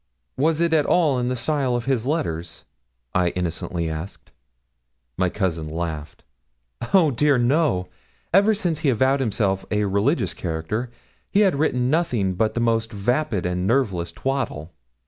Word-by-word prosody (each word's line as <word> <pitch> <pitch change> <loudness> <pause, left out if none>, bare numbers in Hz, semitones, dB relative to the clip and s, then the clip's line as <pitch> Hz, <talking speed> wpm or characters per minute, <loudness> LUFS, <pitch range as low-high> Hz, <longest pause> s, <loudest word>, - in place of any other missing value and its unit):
'Was 155 +4 +1
it 170 -1 +2
at 150 -3 +3
all 155 -7 +3
in 125 - -1
the 125 - 0
style 130 0 0
of 120 -1 -2
his 130 -3 0
letters?' 85 - -3 0.5
I 90 -1 +2
innocently 85 -1 -2
asked. 80 +5 -7 0.8
My 90 0 +1
cousin 85 -6 -2
laughed. 80 -2 -5 0.7
'Oh, 175 -6 +5
dear, 145 +2 +3
no! 120 - +2 0.5
Ever 205 +4 +5
since 175 -7 -1
he 155 -3 +1
avowed 130 +3 +2
himself 100 -6 0
a 105 -1 +1
religious 100 - +1
character, 90 +8 -3 0.4
he 205 - +3
had 190 -9 +3
written 125 -4 +1
nothing 125 - +1
but 110 +4 0
the - - 0
most 115 -1 +1
vapid 110 - -1
and 90 +1 -1
nerveless 100 -9 0
twaddle. 90 - -3
115 Hz, 150 wpm, -23 LUFS, 90-145 Hz, 0.8 s, Oh